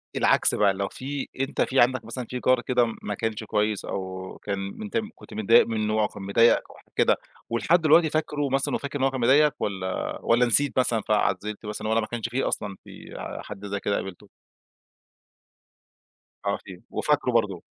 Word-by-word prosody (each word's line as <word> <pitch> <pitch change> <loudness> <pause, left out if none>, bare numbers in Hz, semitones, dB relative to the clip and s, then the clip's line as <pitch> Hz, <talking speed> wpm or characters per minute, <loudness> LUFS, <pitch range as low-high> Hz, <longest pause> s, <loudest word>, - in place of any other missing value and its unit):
العكس - - +4
بقى 100 -2 +3
لو 100 +1 -3
في 140 +2 -5
أنت 135 +2 -1
في 135 - +2
عندك 125 0 +3
مثلًا 120 +2 -5
في 125 - -4
جار 130 0 +4
كده 125 -1 +2
م 115 - -5
ماكانش 110 +1 -3
كويس 105 0 -1
أو 95 -1 -5
كان 100 -1 -2
م 95 - -6
أنت 215 +2 -3 0.2
كنت - - -14
متضايق 110 +2 +5
منه، 110 -1 0
كان 100 - -10
مضايقك 115 +4 +4
أو - - -14
حاجة - - -22
كده، - - +3 0.3
ولحد 160 +9 +2
دلوقتي 160 +1 +5
فاكرُه 145 -2 -1
مثلًا، 135 +1 +1
وفاكر 140 0 -4
إن - - 0
هو 135 - +3
كان 130 -2 -4
مضايقك، 145 +4 +4
والَّا، 95 -2 -3
والَّا 120 +2 +3
نسيت 135 +3 +4
مثلًا 120 -3 +2
فعزِّلت 105 0 -1
مثلًا، 105 +1 -4
والَّا 110 +1 +2
ما 110 - -4
كانش 120 -1 -4
فيه 130 +3 -1
أصلًا 100 -2 -2
في - - -12 0.3
حد 100 0 -9
زي 100 0 -3
كده 100 0 -1
قابلتُه؟ 95 -3 -6 2.2
آه، 100 - +1
في. 90 -2 -11
وفاكرُه 145 -4 +1
برضه. 105 -7 0
115 Hz, 185 wpm, -25 LUFS, 100-130 Hz, 2.2 s, متضايق